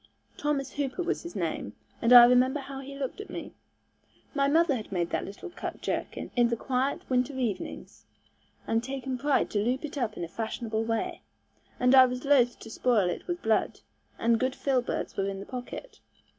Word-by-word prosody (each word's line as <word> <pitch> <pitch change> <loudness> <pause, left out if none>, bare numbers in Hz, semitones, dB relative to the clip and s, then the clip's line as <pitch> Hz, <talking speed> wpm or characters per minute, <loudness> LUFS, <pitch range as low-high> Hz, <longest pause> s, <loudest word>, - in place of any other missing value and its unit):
Thomas 280 -2 -1
Hooper 285 +5 -2
was 360 +2 -1
his 340 - -9
name, - - -3 0.3
and 230 - +2
I 245 -1 +12
remember 250 +3 +4
how 275 0 -7
he 275 +1 -8
looked 275 +8 -4
at - - -10
me. - - -7 0.8
My 280 -1 +2
mother 315 0 +3
had 215 -4 -6
made 175 -3 -1
that - - -1
little 200 - -9
cut - - -6
jerkin, - - -4
in 240 -1 +5
the 235 0 -1
quiet 260 +3 -1
winter 255 +1 0
evenings. 225 -8 -4 0.6
And 225 +1 0
taken 265 0 -4
pride 290 +1 +1
to 210 - +1
loop 255 +6 0
it 290 -1 -5
up 225 -4 -2
in - - -3
a - - -3
fashionable 225 +3 -3
way, 225 0 -2 0.6
and 250 +1 +4
I 260 -1 +9
was 250 +2 -5
loth 260 -4 +4
to 225 - -9
soil 220 -7 +2
it - - -7
with 350 0 -3
blood, 220 -1 +1 0.4
and 230 0 +2
good 260 +2 0
filberds 255 -3 -1
were 195 0 0
in 195 -1 -5
the 195 - -7
pocket. 255 - -8
255 Hz, 195 wpm, -28 LUFS, 230-275 Hz, 0.8 s, I